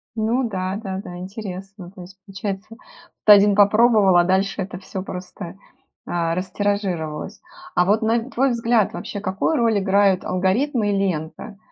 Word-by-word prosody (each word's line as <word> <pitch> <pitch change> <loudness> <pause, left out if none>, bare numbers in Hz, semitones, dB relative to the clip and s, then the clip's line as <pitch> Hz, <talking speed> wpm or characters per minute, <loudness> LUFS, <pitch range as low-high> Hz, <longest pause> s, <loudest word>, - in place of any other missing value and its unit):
Ну 230 +4 0
да-да-да, 190 -2 -5
интересно. 195 -1 -8
То 190 -2 -12
есть 190 +2 -13
получается, 195 +2 -6 0.5
то 210 - +10
1 205 0 +5
попробовал, 210 -2 +5
а 175 - +6
дальше 190 +2 0
это 180 -1 -5
всё 190 0 -7
просто, 180 0 -8 0.5
а, 170 -1 -1
растиражировалось. 190 -2 -3 0.3
А 180 - +4
вот 210 +4 +2
на 230 +3 0
твой 270 +1 +1
взгляд, 230 -2 +1
вообще 205 - -6
какую 195 +10 -1
роль 230 -3 +2
играют 195 -1 +2
алгоритмы 205 +5 0
и 200 - 0
лента? 185 +1 -3
195 Hz, 145 wpm, -21 LUFS, 185-215 Hz, 0.5 s, то